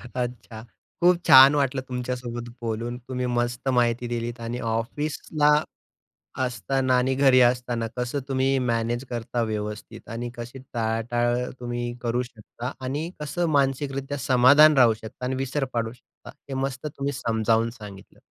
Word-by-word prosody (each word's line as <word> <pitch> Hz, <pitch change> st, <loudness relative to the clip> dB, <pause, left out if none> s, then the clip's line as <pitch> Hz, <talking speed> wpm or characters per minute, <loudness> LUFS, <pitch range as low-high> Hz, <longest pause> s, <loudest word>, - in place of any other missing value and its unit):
अच्छा. 120 Hz, -3 st, -5 dB, 0.4 s
खूप 175 Hz, 0 st, +5 dB
छान 135 Hz, +2 st, +9 dB
वाटलं 135 Hz, -2 st, 0 dB
तुमच्यासोबत 125 Hz, -1 st, -4 dB
बोलून. 115 Hz, +1 st, -3 dB
तुम्ही 125 Hz, -1 st, -2 dB
मस्त 120 Hz, +1 st, -1 dB
माहिती 120 Hz, 0 st, +1 dB
दिलीत 120 Hz, 0 st, -4 dB
आणि 120 Hz, +2 st, -4 dB
ऑफिसला, 145 Hz, +6 st, -1 dB, 1.0 s
असताना 130 Hz, +1 st, 0 dB
आणि 130 Hz, +1 st, +1 dB
घरी 130 Hz, -1 st, +5 dB
असताना 120 Hz, -1 st, +2 dB
कसं 125 Hz, +3 st, -2 dB
तुम्ही 135 Hz, 0 st, +1 dB
मॅनेज 120 Hz, 0 st, -1 dB
करता 120 Hz, 0 st, -2 dB
व्यवस्थित 105 Hz, -1 st, -5 dB
आणि 120 Hz, +1 st, -5 dB
कशी 120 Hz, +2 st, -8 dB
टाळाटाळ 120 Hz, +1 st, 0 dB, 0.2 s
तुम्ही 120 Hz, 0 st, -3 dB, 0.2 s
करू 120 Hz, +1 st, 0 dB
शकता 120 Hz, +1 st, -8 dB
आणि 150 Hz, +6 st, -3 dB
कसं 170 Hz, +4 st, -1 dB
मानसिकरित्या 135 Hz, 0 st, -1 dB
समाधान 135 Hz, +4 st, +6 dB
राहू 120 Hz, -3 st, +6 dB
शकता 110 Hz, +3 st, -10 dB
आणि 130 Hz, +1 st, -1 dB
विसर 135 Hz, +2 st, -1 dB
पाडू 115 Hz, -1 st, -2 dB
शकता. 125 Hz, -, -16 dB, 0.2 s
हे 135 Hz, -, -4 dB
मस्त 135 Hz, +1 st, -3 dB
तुम्ही 140 Hz, -1 st, -3 dB
समजावून 115 Hz, -2 st, +1 dB
सांगितलं. 105 Hz, -4 st, -12 dB
125 Hz, 140 wpm, -25 LUFS, 115-135 Hz, 1.0 s, छान